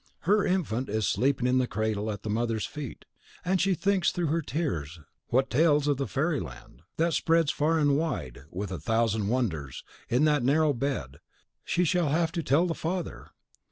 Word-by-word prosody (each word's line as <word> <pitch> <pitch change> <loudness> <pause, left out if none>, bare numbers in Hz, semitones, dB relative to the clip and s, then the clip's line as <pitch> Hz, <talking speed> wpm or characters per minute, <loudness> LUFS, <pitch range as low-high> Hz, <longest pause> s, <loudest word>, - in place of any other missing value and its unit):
Her 205 +4 +3
infant 135 - -1
is 110 0 0
sleeping 130 +3 +1
in 125 +1 +3
the 125 - +1
cradle 110 0 -2
at 105 -1 -5
the 110 - -4
mother's 115 0 -1
feet; 145 -4 -7 0.4
and 185 0 +2
she 195 -1 +2
thinks 195 0 +1
through 175 -3 -1
her 165 +2 +1
tears 100 - -3 0.3
what 130 +2 +1
tales 150 +1 +3
of 145 -2 +2
the 135 - -2
fairy 150 +1 0
land, - - -10 0.2
that 165 +1 +2
spreads 165 -1 +2
far 160 +3 +1
and 145 -2 +3
wide, 140 - -2
with 95 +3 -5
a 90 - -4
thousand 110 +3 +1
wonders, 95 - -2 0.3
in 125 +5 +2
that 150 -2 +3
narrow 145 +4 +3
bed, 115 - -3 0.4
she 180 - +1
shall 170 -1 +2
have 165 +2 +1
to 170 0 -2
tell 155 +4 +3
the 170 - -1
father! 170 +1 -4
140 Hz, 190 wpm, -28 LUFS, 110-165 Hz, 0.4 s, Her